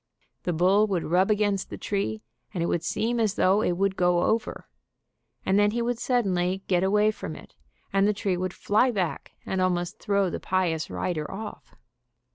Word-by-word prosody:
The 180 - +1
bull 190 +6 +3
would 185 -5 -1
rub 180 +5 +2
against 205 -2 +1
the - - -6
tree, 110 - -2 0.3
and 170 - 0
it - - +1
would 170 - -1
seem 235 +2 -1
as 215 -3 +1
though 195 +3 +3
it 180 - +1
would 190 +2 0
go 180 -1 +2
over, 225 +1 -1 0.8
and 195 +2 +3
then 205 0 +4
he 235 +3 -1
would 240 0 -1
suddenly 190 -7 0
get 180 -1 +2
away 210 +2 +3
from - - -7
it - - -13 0.4
and 195 +1 +4
the - - +4
tree 200 -2 -1
would 185 +1 -2
fly 215 +7 +2
back 190 -8 -3
and 190 -1 -1
almost 175 -1 -1
throw 200 -3 +1
the - - -4
pious 175 -4 -1
rider 155 -4 -3
off. 210 +2 -8
190 Hz, 190 wpm, -26 LUFS, 180-210 Hz, 0.8 s, then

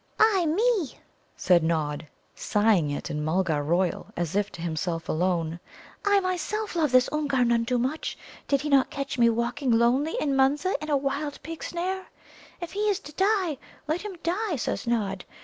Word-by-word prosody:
"Ah, 405 -5 +4
me!" 400 - +1 0.4
said 180 -2 +4
Nod, 155 -2 -1 0.3
sighing 205 -7 +2
it 145 - -4
in 150 0 -2
Mulgar 160 -1 +1
royal, 170 +4 0
as 170 0 -2
if 205 0 +1
to - - -9
himself 165 0 -2
alone, 170 -1 0 0.4
"I 405 -1 +4
myself 370 +3 -2
love 310 -5 +2
this 255 -1 +5
Oomgar 280 -4 +1
none 235 -1 +2
too 250 0 +1
much. 260 +6 -2 0.3
Did 280 -2 +2
he 300 - -3
not 275 -2 +4
catch 275 -2 -4
me 235 -1 +6
walking 240 +4 -1
lonely 245 +7 +3
in 280 -2 0
Munza 285 +7 +2
in 305 - -5
a 290 - +3
wild 280 +2 -2
pig 325 +3 -7
snare? 370 +2 -3 0.5
If 345 -2 -6
he 420 +1 0
is 400 - +2
to 295 - -11
die, 380 -6 +1 0.3
let 315 +3 -1
him 415 -3 -6
die, 370 +1 0
says 235 - -3
Nod. 200 -5 -1
270 Hz, 180 wpm, -26 LUFS, -, 0.5 s, me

